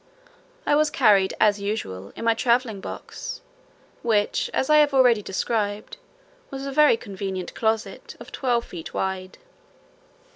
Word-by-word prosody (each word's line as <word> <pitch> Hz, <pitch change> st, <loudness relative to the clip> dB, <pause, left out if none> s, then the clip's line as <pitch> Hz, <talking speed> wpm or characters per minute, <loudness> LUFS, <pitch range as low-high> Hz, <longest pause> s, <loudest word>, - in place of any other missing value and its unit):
I -, -, +2 dB
was 305 Hz, +1 st, +3 dB
carried, 205 Hz, -9 st, +3 dB
as 205 Hz, -2 st, +3 dB
usual, 100 Hz, -, -4 dB
in -, -, -6 dB
my 230 Hz, -, +4 dB
travelling 235 Hz, -3 st, +1 dB
box, -, -, -7 dB, 0.6 s
which 210 Hz, -3 st, +1 dB
as 265 Hz, -, 0 dB
I 305 Hz, -, +5 dB
have 295 Hz, -2 st, +4 dB
already 245 Hz, -5 st, +5 dB
described, 205 Hz, -, -2 dB, 0.5 s
was 270 Hz, 0 st, -6 dB
a 275 Hz, -, -4 dB
very 295 Hz, -4 st, +5 dB
convenient 190 Hz, -4 st, -5 dB
closet, 220 Hz, 0 st, -2 dB
of -, -, -11 dB
twelve 240 Hz, -3 st, 0 dB
feet 170 Hz, -3 st, -9 dB
wide. 190 Hz, -1 st, -3 dB
220 Hz, 140 wpm, -24 LUFS, 195-260 Hz, 0.6 s, I